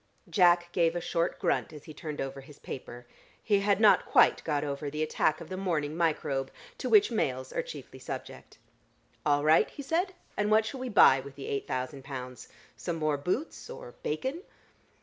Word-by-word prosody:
Jack 175 0 +4
gave 170 -1 +2
a - - 0
short 170 0 -1
grunt - - 0
as 150 -2 -11
he 155 - -10
turned 150 0 -6
over 135 0 -4
his 140 +1 -15
paper. 120 -2 -8 0.4
He 205 -2 +3
had 200 0 +2
not 215 -2 +5
quite - - +5
got 150 -2 0
over 145 0 -3
the 150 +2 -2
attack 155 0 +1
of - - -9
the 185 - -5
morning 160 -6 -1
microbe, 150 -5 0 0.3
to - - -2
which 420 - +6
males 130 - -1
are - - 0
chiefly - - -10
subject. - - -8 0.7
"All 145 0 +3
right," 155 +1 +5
he 285 - -8
said. 355 +6 0 0.2
"And 210 0 0
what 215 +1 +4
shall 265 +4 -5
we 255 0 -4
buy 135 - +7
with 135 +1 -10
the 140 - -8
eight 140 - -3
thousand 130 +1 -4
pounds? 125 -2 -7 0.3
Some 170 - -4
more 155 -2 0
boots 185 - -3
or 485 0 -9
bacon?" 335 - -3
160 Hz, 190 wpm, -29 LUFS, 140-210 Hz, 0.7 s, buy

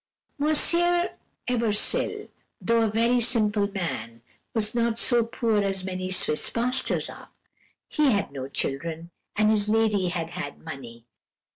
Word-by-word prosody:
"Monsieur 345 +4 +3 0.4
Eversil, 230 -4 0 0.3
though 230 0 +2
a 225 - +2
very 235 +3 +2
simple 215 -3 +2
man, 115 - -4 0.3
was 215 -3 0
not 235 -1 +1
so 240 0 +3
poor 225 -2 0
as 195 -1 -1
many 185 0 -4
Swiss 185 -5 +2
pastors 250 +3 0
are. - - -11 0.6
He 300 -2 +2
had 205 - +1
no 135 -2 -5
children, 160 +5 -3 0.2
and 215 +1 +4
his 210 -1 +1
lady 215 -4 +2
had 170 -2 -3
had 160 -6 -6
money. 120 -7 -9
210 Hz, 135 wpm, -26 LUFS, 170-235 Hz, 0.6 s, and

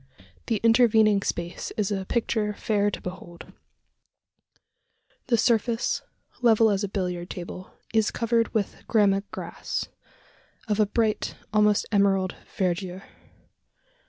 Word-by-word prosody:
The 225 -3 0
intervening 225 -3 +5
space 175 -2 -3
is 210 -2 0
a 195 -2 -2
picture 215 -3 0
fair 205 -1 +1
to - - -5
behold. 175 -1 -9 1.7
The 240 -2 +3
surface, 235 - +1 0.4
level 225 -2 +5
as 200 0 0
a - - 0
billiard 180 -2 -3
table, 180 +1 -8 0.2
is 220 -2 +3
covered 230 0 0
with 210 -3 -2
gramma 200 -3 +3
grass, - - -5 0.8
of 210 0 0
a 210 - +4
bright, 215 0 0 0.2
almost 210 -1 +3
emerald 195 -2 +2 0.2
verdure. 185 0 -1
210 Hz, 115 wpm, -26 LUFS, 190-225 Hz, 1.7 s, intervening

